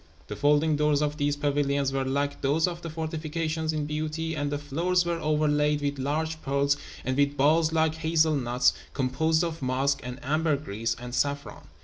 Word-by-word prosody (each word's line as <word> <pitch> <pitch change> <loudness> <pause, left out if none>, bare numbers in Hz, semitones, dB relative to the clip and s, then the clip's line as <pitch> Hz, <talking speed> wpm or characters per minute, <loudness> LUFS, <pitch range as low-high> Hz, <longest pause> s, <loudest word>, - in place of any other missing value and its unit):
The 105 - -4
folding 150 +3 +3
doors 150 -1 +2
of 150 0 -2
these 145 -1 +1
pavilions 140 -1 0
were 135 -1 0
like 140 +2 -1
those 150 +5 +2
of 175 -1 -5
the 170 - -5
fortifications 160 0 -2
in 155 -2 -2
beauty, 155 +2 -3
and 145 -1 -2
the 145 - -1
floors 170 +5 0
were 170 -1 -1
overlaid 150 -1 +2
with 140 -1 -2
large 155 +4 -2
pearls, 140 +1 +1 0.3
and 130 - 0
with 145 +1 +1
balls 155 +3 +4
like 160 -1 +2
hazel 160 0 +2
nuts, 125 -1 +2 0.2
composed 160 +5 +1
of 165 -2 -3
musk 135 +2 +1
and 125 +1 -7
ambergris 140 -7 0
and 125 0 -8
saffron. 140 +2 -2
150 Hz, 175 wpm, -27 LUFS, 140-160 Hz, 0.3 s, balls